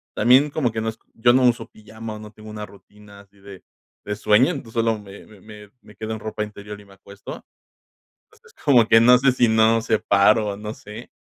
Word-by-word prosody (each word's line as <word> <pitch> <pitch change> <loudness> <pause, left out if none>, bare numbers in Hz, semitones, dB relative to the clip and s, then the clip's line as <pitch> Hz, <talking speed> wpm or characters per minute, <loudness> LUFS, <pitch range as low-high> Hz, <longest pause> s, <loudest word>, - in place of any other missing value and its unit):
también 130 +6 +4
como 135 -6 -1
que 110 - -4
no 110 - -2
es 110 0 -10 0.2
yo 120 +2 +3
no 130 +1 +3
uso 120 -1 -1
pijama, 110 +1 -10
o - - -10
no 105 0 -11
tengo 110 0 -13
una 105 0 -7
rutina 100 0 -17
así 100 0 -25
de 100 -1 -13 0.4
de 105 - -4
sueño. 105 +4 +3
Entonces, 130 -9 -8
solo 115 -1 0
me 100 -1 -13
me 105 -2 -18
me 105 -1 -14
me 105 - -18
quedo 110 0 -6
en 110 - -6
ropa 110 0 -4
interior 105 0 -10
y - - -18
me 100 - -19
acuesto. 100 +1 -12 0.8
Entonces, - - -24
como 125 -5 +5
que, 115 - +6
no 125 +2 +6
sé, 135 +1 +3
si 125 -1 +2
no 110 +1 +3
separo, 105 -1 +2
o 100 - -6
no 105 +1 -7
sé. 105 +3 -12
110 Hz, 225 wpm, -21 LUFS, 105-115 Hz, 0.8 s, que